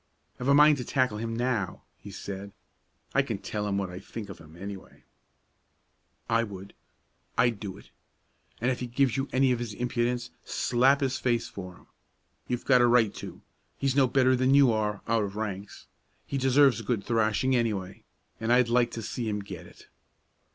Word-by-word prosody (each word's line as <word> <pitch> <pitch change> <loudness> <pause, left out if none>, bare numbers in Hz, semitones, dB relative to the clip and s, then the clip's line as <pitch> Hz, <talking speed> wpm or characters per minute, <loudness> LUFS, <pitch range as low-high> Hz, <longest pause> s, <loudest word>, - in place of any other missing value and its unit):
"I've 125 - -3
a 140 - +6
mind 150 0 +7
to 125 - -4
tackle 125 -4 0
him 115 0 -3
now," 120 -5 -1
he 105 - -12
said. 100 0 -7 0.6
"I - - +4
can - - -3
tell 105 -1 -4
him 100 -1 0
what 95 -2 -2
I 90 - -7
think 105 +1 -8
of 95 - -9
him, 80 0 -15
anyway." 100 +1 -9 1.2
"I 115 0 +2
would; 100 -2 -8 0.6
I'd 120 -4 +3
do 95 -2 -6
it. - - -17 0.7
And 125 +3 +1
if 125 - -3
he 125 - -3
gives 125 0 +1
you 135 +1 -1
any 130 0 +3
of 125 - 0
his 115 -3 -5
impudence, 120 0 -1
slap 135 +4 +2
his 130 -2 0
face 120 -2 0
for 90 -2 -8
him. - - -20 0.6
You've 125 -1 -3
got 125 -2 +5
a 120 - +5
right 120 -3 +4
to; - - -9 0.3
he's 135 -1 0
no 135 -2 +5
better 130 0 +3
than 130 +2 +3
you 140 -4 +6
are, 105 -2 -1
out 115 -1 +2
of 100 0 -5
ranks. 105 -2 -5 0.4
He 140 - -3
deserves 135 -1 +4
a - - -7
good 115 -5 -1
thrashing, 115 +3 +1
anyway, 105 -6 -2 0.4
and 115 +1 -1
I'd 125 -1 +4
like 120 0 +3
to 115 - -5
see 115 +1 -3
him 105 -1 -2
get 90 -3 -9
it." - - -17
115 Hz, 195 wpm, -28 LUFS, 100-125 Hz, 1.2 s, mind